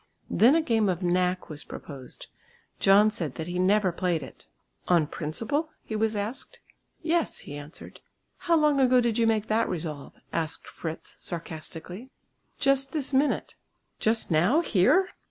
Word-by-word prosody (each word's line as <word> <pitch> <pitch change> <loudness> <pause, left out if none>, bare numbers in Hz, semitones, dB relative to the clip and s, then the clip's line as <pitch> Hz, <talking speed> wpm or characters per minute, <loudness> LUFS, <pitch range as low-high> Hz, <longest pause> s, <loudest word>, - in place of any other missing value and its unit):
Then 250 +7 +5
a 330 - +3
game 225 -7 +2
of 180 0 -2
"knack" 180 +1 +1
was 150 -3 -8
proposed. 135 -4 -10 0.5
John 205 +2 +5
said 165 - -4
that 160 - -4
he 175 +1 -3
never 190 +1 +3
played 170 -3 -1
it. 130 - -12 0.4
"On 170 -3 +4
principle?" 225 - -2
he 220 - -5
was 220 0 0
asked. 210 +6 -5 0.4
"Yes," 330 0 0
he 145 - -7
answered. 145 +2 -10 0.5
"How 335 - +6
long 300 -3 +3
ago 255 -1 +5
did 235 -1 +1
you 230 - +3
make 220 -2 +1
that 225 +1 +1
resolve," 155 -5 -5 0.2
asked 160 -2 -3
Fritz 160 -1 -7
sarcastically. 170 +6 -7 0.5
"Just 275 0 +2
this 290 -3 0
minute." 275 +3 +1 0.5
"Just 220 -3 +2
now, 180 - +4
here?" 340 - +3
205 Hz, 155 wpm, -27 LUFS, 165-255 Hz, 0.5 s, How